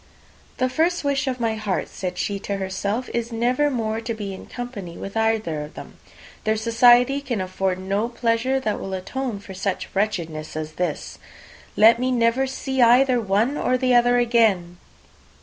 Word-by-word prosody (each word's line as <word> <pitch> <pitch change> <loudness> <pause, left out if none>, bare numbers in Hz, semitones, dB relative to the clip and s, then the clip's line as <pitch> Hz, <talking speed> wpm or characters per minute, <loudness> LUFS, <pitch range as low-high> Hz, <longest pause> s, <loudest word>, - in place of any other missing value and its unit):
"The 255 - +1
first 325 +7 0
wish 280 -1 0
of 255 -1 -2
my 230 -2 0
heart," 215 -3 -2
said 180 -1 -5
she 200 +2 -2
to 200 0 -3
herself, 200 +5 -2
"is 235 0 -2
never 250 +6 +1
more 225 -4 -2
to 230 0 -4
be 205 -3 -5
in 190 - -10
company 220 -9 -7
with 195 - -7
either 220 -8 0
of 150 +1 -9
them. - - -11 0.4
Their 215 0 +1
society 240 +4 +4
can 250 -6 -3
afford 185 0 -1
no 200 +5 -1
pleasure 240 +2 0
that 215 -5 -1
will 190 0 -4
atone 235 +5 -4
for 200 -1 -10
such 190 0 -3
wretchedness 170 -8 -2
as 155 0 -4
this! 180 +3 -4 0.6
Let 225 +2 +6
me 255 +1 0
never 240 +2 +2
see 265 0 -2
either 245 +1 +5
one 220 +7 +1
or 255 - +1
the 255 0 +1
other 245 0 +5
again!" 220 -8 +2
225 Hz, 175 wpm, -23 LUFS, 195-250 Hz, 0.6 s, Let